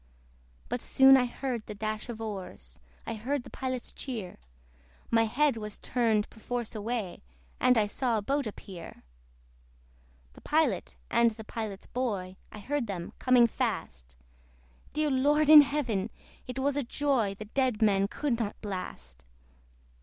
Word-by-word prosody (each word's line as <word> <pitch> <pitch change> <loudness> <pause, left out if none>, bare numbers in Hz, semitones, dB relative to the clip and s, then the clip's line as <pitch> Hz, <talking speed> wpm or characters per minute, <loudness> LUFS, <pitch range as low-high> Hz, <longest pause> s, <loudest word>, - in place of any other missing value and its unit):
But 245 0 -3
soon 270 0 +7
I 250 -2 +3
heard 245 -2 -4
the 210 - -6
dash 215 +3 -4
of 230 -2 -5
oars; 210 -4 -7 0.3
I 230 - -3
heard 245 +5 -2
the - - -12
Pilot's 255 -2 -4
cheer; 220 -9 -5 0.7
My 225 0 +4
head 270 +3 +2
was 210 -1 -6
turned 225 -4 +1
perforce 240 +1 -4
away, 215 -3 -3 0.4
And 250 -1 +4
I 215 - +4
saw 230 +2 0
a - - -1
boat 280 +2 0
appear. 185 -5 -9 1.3
The - - -16
Pilot, 300 - +1 0.2
and 235 0 +5
the 220 0 -9
Pilot's 215 -3 -6
boy, 200 -8 -3 0.2
I - - -9
heard 260 +4 -2
them 180 -4 -5
coming 250 -2 +5
fast: 65 - -3 0.8
Dear 300 0 +1
Lord 290 +3 +3
in 305 -1 +12
Heaven! 245 -9 -1 0.4
it 250 0 -6
was 275 +1 +1
a 290 - +1
joy 250 -6 0
The 215 - -8
dead 245 -1 0
men 200 -2 +3
could 255 +1 -1
not 210 -3 -3
blast. 65 - -7
230 Hz, 150 wpm, -29 LUFS, 210-260 Hz, 1.3 s, in